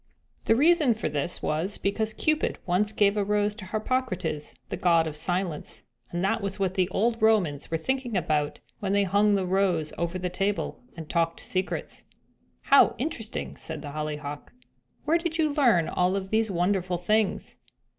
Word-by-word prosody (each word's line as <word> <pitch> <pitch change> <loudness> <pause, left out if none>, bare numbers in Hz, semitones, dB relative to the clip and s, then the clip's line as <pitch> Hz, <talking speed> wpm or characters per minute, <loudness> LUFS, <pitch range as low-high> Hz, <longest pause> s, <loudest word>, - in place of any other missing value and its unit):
The 225 - +4
reason 300 -2 +4
for 215 - -2
this 150 +3 -2
was 165 +7 -1
because 215 +2 0
Cupid 310 +5 0
once 190 +4 +1
gave 205 -1 +3
a 205 - +1
rose 210 +1 +1
to 210 -3 -9
Harpocrates, 215 - -2
the - - -2
God 170 -2 +3
of 155 -2 -4
Silence, 175 0 -2 0.3
and 175 +1 -3
that 195 - +1
was 200 0 -3
what 190 -2 0
the 185 -1 +1
old 230 +4 0
Romans 190 -10 +2
were 165 - 0
thinking 245 +4 -2
about 150 -3 0 0.2
when 195 -1 -1
they 200 0 +3
hung 205 +2 +3
the 190 -2 0
rose 180 -4 +1
over 170 +1 -1
the 180 0 -2
table 195 +2 -2 0.2
and 160 -2 -7
talked 165 0 0
secrets." 185 +1 -2 0.6
"How 280 - +5
interesting!" 235 -6 -4
said 160 -2 -4
the 145 - -6
Hollyhock. 150 -1 -5 0.5
"Where 325 +3 +3
did 335 -1 -2
you 310 -3 +1
learn 235 - +4
all 180 +1 +1
of 190 -1 -4
these 220 0 +2
wonderful 180 0 0
things?" 210 +4 0
195 Hz, 175 wpm, -27 LUFS, 170-220 Hz, 0.6 s, How